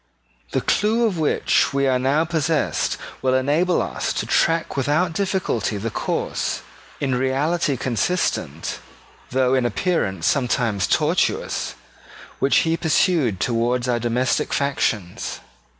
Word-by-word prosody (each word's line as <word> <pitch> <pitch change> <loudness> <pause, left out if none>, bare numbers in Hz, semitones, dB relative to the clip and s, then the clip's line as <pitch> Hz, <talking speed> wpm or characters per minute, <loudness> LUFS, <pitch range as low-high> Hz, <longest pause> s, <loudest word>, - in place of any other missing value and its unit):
The - - +1
clue 225 +3 +2
of 195 -7 -1
which 155 -2 +2
we 140 0 +2
are 130 -1 +2
now 140 +5 +2
possessed 160 -2 0 0.2
will 130 0 +2
enable 150 +7 +2
us - - -3
to - - -2
track 165 0 +1
without 150 +6 +1
difficulty 185 - -1
the 110 +3 -3
course, - - -2 0.4
in 135 -2 0
reality 135 +4 0
consistent, 130 - -1 0.5
though 130 0 +2
in 130 -1 +2
appearance 105 - -1
sometimes 120 -6 +1
tortuous, - - 0 0.6
which 135 - +3
he 165 0 +2
pursued 155 - +2
towards 120 +4 0
our 120 -1 +1
domestic 120 +2 0
factions. 110 -10 -1
135 Hz, 120 wpm, -22 LUFS, 120-165 Hz, 0.6 s, which